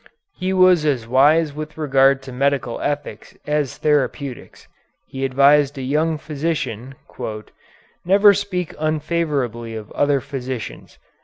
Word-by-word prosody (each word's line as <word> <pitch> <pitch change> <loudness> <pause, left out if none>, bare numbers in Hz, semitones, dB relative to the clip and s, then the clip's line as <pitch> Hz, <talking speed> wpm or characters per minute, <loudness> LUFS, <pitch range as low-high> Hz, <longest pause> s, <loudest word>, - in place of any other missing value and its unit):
He 185 0 -2
was 185 -3 +5
as 130 -7 0
wise 145 +5 +3
with 150 +1 -7
regard 135 -2 +3
to 135 - -9
medical 135 -2 -1
ethics 145 0 -4
as 150 -2 -1
therapeutics. 140 -3 -2 0.4
He 135 0 -6
advised 140 +2 +3
a 135 - -5
young 155 +4 0
physician, 140 -5 -4 1.1
"Never 200 +3 +6
speak 185 -4 -3
unfavorably 150 -7 -2
of 110 -1 -8
other 145 -1 +1
physicians. 130 -5 -7
145 Hz, 120 wpm, -20 LUFS, 135-155 Hz, 1.1 s, Never